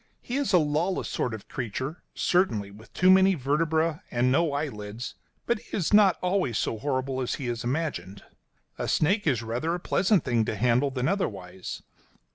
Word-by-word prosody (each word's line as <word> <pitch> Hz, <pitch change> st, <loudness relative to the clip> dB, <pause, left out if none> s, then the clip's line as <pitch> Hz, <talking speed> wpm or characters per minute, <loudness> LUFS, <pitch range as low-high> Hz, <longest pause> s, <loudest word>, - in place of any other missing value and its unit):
He 245 Hz, -, -4 dB
is 280 Hz, -4 st, 0 dB
a 185 Hz, -, +6 dB
lawless 160 Hz, +4 st, 0 dB
sort 125 Hz, -, -2 dB
of 110 Hz, -2 st, -8 dB
creature, 130 Hz, -, -4 dB
certainly, 110 Hz, -, +1 dB
with 110 Hz, +3 st, -15 dB
too 185 Hz, +1 st, +4 dB
many 190 Hz, 0 st, +6 dB
vertebræ 160 Hz, +3 st, 0 dB
and 125 Hz, +1 st, +1 dB
no 165 Hz, +3 st, +2 dB
eyelids; 120 Hz, -6 st, -4 dB, 0.3 s
but 235 Hz, -2 st, +1 dB
he 235 Hz, -, -6 dB
is 185 Hz, +1 st, -1 dB
not 205 Hz, -4 st, +6 dB
always 180 Hz, -, +1 dB
so 110 Hz, -, -1 dB
horrible 130 Hz, 0 st, -1 dB
as 125 Hz, -, -1 dB
he 135 Hz, -, -6 dB
is 120 Hz, -1 st, -3 dB
imagined. 120 Hz, -, -3 dB, 0.6 s
A -, -, -2 dB
snake 195 Hz, +5 st, +2 dB
is 125 Hz, -6 st, +1 dB
rather 125 Hz, +10 st, -1 dB
a -, -, -4 dB
pleasant 190 Hz, 0 st, +2 dB
thing 120 Hz, -3 st, +1 dB
to -, -, -2 dB
handle 125 Hz, +5 st, +2 dB
than 130 Hz, 0 st, -2 dB
otherwise. 95 Hz, -, -3 dB
140 Hz, 180 wpm, -27 LUFS, 120-175 Hz, 0.6 s, a